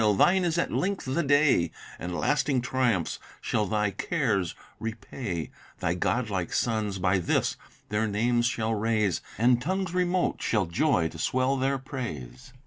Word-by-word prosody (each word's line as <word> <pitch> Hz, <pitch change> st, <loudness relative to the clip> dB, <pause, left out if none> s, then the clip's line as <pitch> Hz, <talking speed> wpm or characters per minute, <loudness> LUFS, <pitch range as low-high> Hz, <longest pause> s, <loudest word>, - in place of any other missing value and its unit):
thine 190 Hz, -, +5 dB
is 170 Hz, -1 st, +1 dB
at 170 Hz, -, 0 dB
length 195 Hz, +1 st, -1 dB
the 135 Hz, +6 st, 0 dB
day, 145 Hz, -, +4 dB, 0.3 s
And 90 Hz, 0 st, -4 dB
lasting 145 Hz, -3 st, +1 dB
triumphs 120 Hz, -8 st, 0 dB, 0.2 s
shall 105 Hz, -2 st, 0 dB
thy 105 Hz, 0 st, +1 dB
cares 105 Hz, -, 0 dB, 0.2 s
repay; 110 Hz, -, -4 dB, 0.3 s
Thy 85 Hz, -, +1 dB
godlike 95 Hz, -1 st, -1 dB
sons, 110 Hz, -4 st, 0 dB
by 95 Hz, +1 st, +2 dB
this, 85 Hz, -, +1 dB, 0.3 s
their 105 Hz, +1 st, +1 dB
names 120 Hz, +3 st, +2 dB
shall 115 Hz, -2 st, -1 dB
raise, 110 Hz, -4 st, +1 dB, 0.2 s
And 120 Hz, +2 st, +4 dB
tongues 185 Hz, +4 st, -1 dB
remote 180 Hz, 0 st, +1 dB
shall 105 Hz, -4 st, +1 dB
joy 85 Hz, -, +2 dB
to 80 Hz, -, -10 dB
swell 130 Hz, +8 st, +1 dB
their 135 Hz, +1 st, +1 dB
praise. 130 Hz, -, -7 dB
115 Hz, 145 wpm, -27 LUFS, 100-135 Hz, 0.3 s, thine